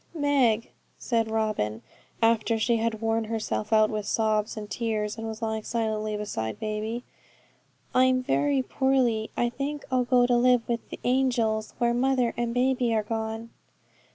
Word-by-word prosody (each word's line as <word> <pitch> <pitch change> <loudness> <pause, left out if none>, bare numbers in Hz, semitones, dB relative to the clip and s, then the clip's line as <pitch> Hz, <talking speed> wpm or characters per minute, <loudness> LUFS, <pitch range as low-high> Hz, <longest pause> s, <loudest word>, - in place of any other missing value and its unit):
'Meg,' 270 -7 +2 0.3
said 230 -2 0
Robin, 215 - -1 0.4
after 225 0 +3
she 230 +1 +2
had 225 -1 -1
worn 225 0 0
herself 215 -1 -3
out 215 -1 +4
with 210 -1 -3
sobs 215 -1 0
and 210 -1 -5
tears, 210 0 -2
and 225 0 -5
was 220 +1 -6
lying 220 -1 -1
silently 215 -2 -2
beside 110 - -4
baby, 215 +2 -3 0.9
'I'm 255 0 +4
very 140 - +1
poorly. 235 - +1
I 240 - +2
think 280 +4 -4
I'll 255 -1 +2
go 245 0 +4
to 245 0 +3
live 245 -1 +3
with 235 -1 -3
the - - -8
angels, 240 -4 +1
where 235 -1 +2
mother 250 -1 +1
and 235 0 -1
baby 250 -1 +1
are 215 - +1
gone.' 225 +1 -4
225 Hz, 155 wpm, -27 LUFS, 215-245 Hz, 0.9 s, out